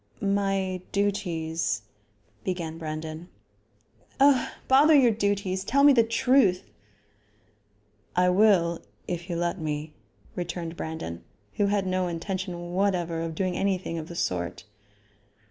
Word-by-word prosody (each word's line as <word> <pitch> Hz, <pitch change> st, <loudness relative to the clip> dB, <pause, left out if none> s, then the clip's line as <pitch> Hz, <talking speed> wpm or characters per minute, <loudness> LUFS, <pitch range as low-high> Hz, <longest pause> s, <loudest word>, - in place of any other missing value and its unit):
"My 195 Hz, -2 st, 0 dB
duties 165 Hz, -, -1 dB, 0.3 s
," 105 Hz, +1 st, -38 dB
began 165 Hz, -3 st, -3 dB
Brandon. 155 Hz, +2 st, -6 dB, 0.9 s
"Oh! 275 Hz, -2 st, +5 dB, 0.2 s
bother 290 Hz, +4 st, +6 dB
your 255 Hz, -5 st, +6 dB
duties. 200 Hz, -3 st, -1 dB
Tell 280 Hz, +7 st, +2 dB
me 285 Hz, -1 st, +8 dB
the 240 Hz, -, +6 dB
truth." 230 Hz, -4 st, +3 dB, 1.5 s
"I 180 Hz, 0 st, +4 dB
will, 180 Hz, -4 st, +4 dB, 0.3 s
if 175 Hz, +1 st, -4 dB
you 170 Hz, -, -2 dB
let 175 Hz, +2 st, -1 dB
me," 150 Hz, -1 st, -4 dB, 0.4 s
returned 175 Hz, -1 st, -4 dB
Brandon, 120 Hz, -, -6 dB, 0.3 s
who 205 Hz, -, +3 dB
had 200 Hz, -1 st, +1 dB
no 185 Hz, -1 st, 0 dB
intention 175 Hz, 0 st, -4 dB
whatever 180 Hz, -4 st, 0 dB
of 165 Hz, -1 st, -4 dB
doing 185 Hz, +1 st, -1 dB
anything 185 Hz, -4 st, -1 dB
of 155 Hz, -, -7 dB
the 170 Hz, -, -9 dB
sort. 90 Hz, -, -2 dB
180 Hz, 125 wpm, -26 LUFS, 165-200 Hz, 1.5 s, me